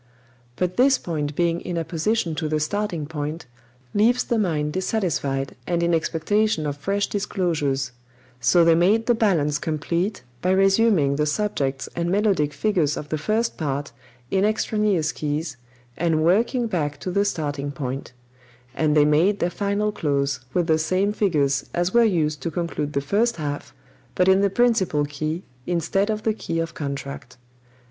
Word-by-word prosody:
"But 180 +3 -2
this 265 +2 +5
point 150 -4 -3
being 170 0 +1
in 175 -2 -4
apposition 165 +3 -1
to 155 0 -2
the 155 0 +1
starting 175 0 -2
point, 150 +1 -5 0.5
leaves 230 +4 +3
the 235 - 0
mind 150 -6 0
dissatisfied 170 -9 -1
and 170 -1 0
in 170 0 +2
expectation 165 +3 +1
of 145 -1 -2
fresh 195 +7 -1
disclosures; 160 -10 -1 0.5
so 165 +8 +4
they 165 - +6
made 195 +7 +3
the 240 - +4
balance 165 -10 +1
complete 170 +4 -2 0.2
by 180 - 0
resuming 195 -7 +3
the 150 0 +1
subjects 145 -7 -1
and 170 0 -1
melodic 195 -6 +2
figures 170 -6 0
of 150 - -6
the 155 - -1
first 220 +7 0
part 140 -2 -2 0.4
in 195 0 +2
extraneous 210 -6 +1
keys, 150 -1 -3 0.4
and 160 -2 +1
working 230 - +2
back 150 -9 -2
to 185 - -3
the 200 +3 +2
starting 145 -7 -2
point; 135 -2 -5 0.6
and 155 +1 +1
they 145 - +6
made 165 +7 +3
their 175 -2 0
final 200 +3 0
close 140 -7 -1
with 175 +3 +1
the 160 -1 +2
same 185 +6 +1
figures 145 -10 +1
as 175 +1 0
were 235 0 +6
used 155 -9 +1
to 165 - -2
conclude 160 -3 -3
the 140 - 0
first 215 +11 +1
half, 145 -2 -4 0.4
but 180 - +3
in 190 +1 +5
the 200 - +3
principal 195 -9 +2
key 155 +4 -4 0.2
instead 175 +4 0
of 215 0 -2
the 220 - +1
key 165 -5 -4
of 165 0 -2
contract." 140 -3 -6
170 Hz, 165 wpm, -23 LUFS, 150-200 Hz, 0.6 s, they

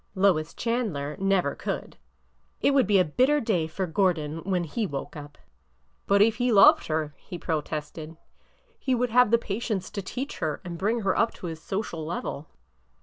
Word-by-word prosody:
Lois 180 -5 +2
Chandler 205 - -2
never 195 -1 +1
could! - - -5 0.6
It - - +3
would 275 -6 +3
be 205 -1 +4
a 185 - +4
bitter 260 - +2
day 190 - 0
for 185 +4 -3
Gordon 165 -4 0
when 180 0 -1
he 205 +7 -2
woke 140 -2 -6
up." 145 -1 -10 0.7
But 200 +1 +5
if 225 0 +2
he 245 0 +1
loved 200 -3 +6
her," 155 -1 -1
he 180 - -8
protested, 155 0 -4 0.3
" - - -37
he 260 -2 0
would 245 -1 0
have 250 -1 +5
patience 210 -2 -3
to 200 - -4
teach 255 +9 -5
her 155 -2 -2
and 170 -1 -6
bring 225 +4 0
her 195 -2 +1
up 230 - +1
to - - -9
his 160 -2 -6
social 180 -3 -4
level." 155 -2 -5
190 Hz, 180 wpm, -26 LUFS, 160-225 Hz, 0.7 s, loved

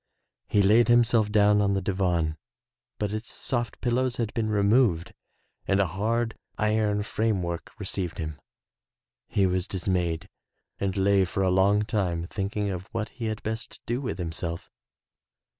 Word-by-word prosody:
He 100 - +3
laid 110 +4 +5
himself 120 -3 +4
down 105 0 +5
on 100 -1 +2
the - - +1
divan 90 -5 0 0.6
but 105 -1 -2
its 110 +2 -4
soft 120 -4 -2
pil 120 -1 0
lows 130 0 +1
had 115 -3 -2
been 110 -2 -1
removed 100 -4 +3 0.5
and 95 - +3
a 100 - +4
hard 110 +6 -1 0.2
iron 105 -1 +1
frame 105 -3 0
work 85 -1 -4
received 90 -4 -2
him. 80 -2 -5 0.9
He 100 - +2
was 90 0 0
dismayed 90 -2 -1 0.5
and 100 -1 -1
lay 100 0 +4
for 95 +2 -1
a 95 - +3
long 100 +3 +4
time 95 -6 -1
thinking 100 +2 -2
of 90 0 -5
what 110 -1 -3
he 120 - -6
had 110 -1 -3
best 110 +1 -4
do 120 +3 -1
with 130 - -3
himself. 85 -1 -4
100 Hz, 160 wpm, -27 LUFS, 95-110 Hz, 0.9 s, laid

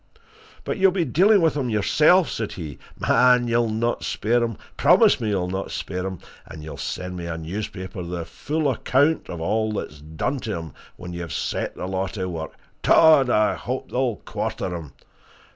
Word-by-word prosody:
"But - - -3
you'll 190 0 +5
be 180 -3 0
dealing 200 +5 +4
with 160 -2 +2
him 135 -4 -1
yourself!" 155 - +4
said 110 -2 -4
he. 75 -6 -7 0.2
"Man! 125 0 +4
you'll 115 -1 +2
not 115 +2 -1
spare 120 +3 +1
him 115 -3 -3 0.2
promise - - +5
me 110 - -1
you'll 95 -3 0
not 95 +1 -3
spare 90 0 -4
him! 95 -1 -5 0.3
And 75 - -10
you'll 80 - -8
send 90 0 -4
me 85 -1 -5
a 80 -1 -4
newspaper 95 +2 -6
with 85 - -6
the 85 -2 -4
full 150 - -2
account 145 +5 +1
of 85 - -5
all 110 +5 0
that's 75 -7 -5
done 80 - -3
to 110 -6 -3
him 80 -4 -8 0.2
when 90 0 -8
you've 85 -2 -6
set - - -2
the - - -5
law 95 +1 -2
to 95 -1 -4
work 80 -3 -5 0.3
dod! 155 -5 +6
I 105 -2 +3
hope 130 +2 -5
they'll 125 -3 0
quarter 90 -1 -4
him! 80 -5 -8
105 Hz, 190 wpm, -23 LUFS, 90-125 Hz, 0.3 s, dod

